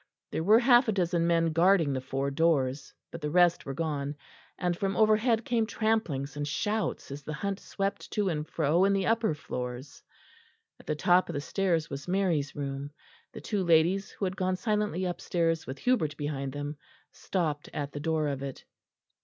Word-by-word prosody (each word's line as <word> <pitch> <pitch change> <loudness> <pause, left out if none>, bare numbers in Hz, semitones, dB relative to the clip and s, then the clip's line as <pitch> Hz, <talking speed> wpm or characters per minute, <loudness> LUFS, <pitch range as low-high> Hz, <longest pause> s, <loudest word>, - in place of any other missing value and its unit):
There 160 - -2
were 210 +5 +6
half 240 0 +5
a - - +3
dozen 175 -3 +1
men 165 -1 +2
guarding 170 -3 +4
the 130 - -2
four 135 +1 -2
doors; 140 -3 +1 0.2
but 170 - -8
the 150 - -2
rest 175 0 +3
were 135 - -4
gone; 145 -2 -2 0.4
and 175 -1 0
from 195 +2 -2
overhead 220 +1 +3
came 230 -2 +1
tramplings 215 -13 -1
and 145 0 -3
shouts 210 +1 -2
as 140 +1 -6
the 150 +2 -5
hunt 200 +5 -3
swept 195 0 -3
to 210 -2 +1
and 155 -3 -2
fro 165 +3 +2
in 200 - +3
the 195 -1 +1
upper 225 -7 +2
floors. 125 -1 -6 0.8
At - - -18
the 155 - 0
top 175 +4 +3
of - - -3
the 145 - -2
stairs 165 0 0
was 140 +3 -6
Mary's 175 -6 0
room; 140 0 -4 0.4
the - - -9
two 205 -3 -1
ladies, 170 +3 +3
who 200 - -4
had 185 0 -2
gone 185 -1 0
silently 210 -3 -1
upstairs 170 -2 -1
with 130 - -5
Hubert 160 - +1
behind 140 -2 -3
them, 145 +1 -5 0.3
stopped 155 -6 -2
at 145 -1 -4
the 145 - -6
door 155 0 0
of 135 -1 -3
it. 140 -1 -7
165 Hz, 185 wpm, -29 LUFS, 145-195 Hz, 0.8 s, were